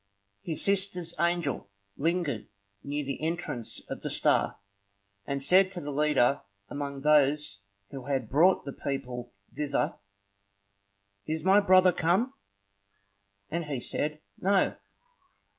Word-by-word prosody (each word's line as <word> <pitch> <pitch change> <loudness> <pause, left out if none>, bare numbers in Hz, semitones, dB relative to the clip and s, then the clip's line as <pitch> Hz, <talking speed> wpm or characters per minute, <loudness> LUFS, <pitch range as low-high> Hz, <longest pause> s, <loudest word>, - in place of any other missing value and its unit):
His 160 +4 -1
sister's 190 -4 +1
angel 170 -11 0 0.3
lingered 160 -6 -1 0.4
near 145 +1 -3
the 140 +2 -4
entrance 160 -8 -3
of - - -6
the - - -3
star, - - +2 0.7
and 140 -1 -2
said 185 +6 +6
to 180 - -2
the 145 -3 -5
leader 140 -3 +2 0.3
among 140 -1 -5
those 145 -7 +3 0.3
who 135 -3 -7
had 135 -5 -1
brought 165 - +4
the 140 - -5
people 125 -3 -5 0.2
thither,— 145 -2 -1 1.3
"Is 160 +2 -2
my 195 +2 +6
brother 185 -2 +6
come?" 185 +11 +1 1.2
And 170 +1 -2
he 145 -4 -3
said, 150 +5 -2 0.2
"No." 195 0 +2
150 Hz, 120 wpm, -29 LUFS, 140-175 Hz, 1.3 s, said